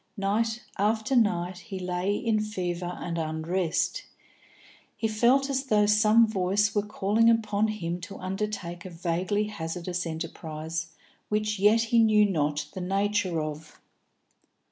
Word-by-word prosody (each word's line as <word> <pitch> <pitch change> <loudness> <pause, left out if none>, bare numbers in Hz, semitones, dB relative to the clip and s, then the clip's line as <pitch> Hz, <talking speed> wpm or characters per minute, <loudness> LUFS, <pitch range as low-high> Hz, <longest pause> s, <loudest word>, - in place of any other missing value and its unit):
Night 220 +4 0 0.2
after 220 +5 +1
night 180 -6 +1
he 190 +2 -7
lay 180 +2 -1
in 225 -1 +1
fever 180 -4 -3
and 170 -1 -3
unrest. 165 - -1 0.9
He 225 - 0
felt 240 +5 +3
as 270 -1 -1
though 210 -5 +3
some 215 +2 +5
voice 200 0 +1
were 205 - +2
calling 210 +2 +2
upon 215 -2 +2
him 175 -5 -3
to 195 +3 -8
undertake 185 -2 -4
a 185 - -7
vaguely 180 +4 -1
hazardous 180 -3 -4
enterprise 160 0 -5 0.4
which 210 -1 0
yet 210 +3 +5
he 235 - +6
knew 215 -2 +5
not 150 -5 0
the 185 - -5
nature 195 -3 0
of. 155 0 -7
200 Hz, 135 wpm, -27 LUFS, 175-215 Hz, 0.9 s, he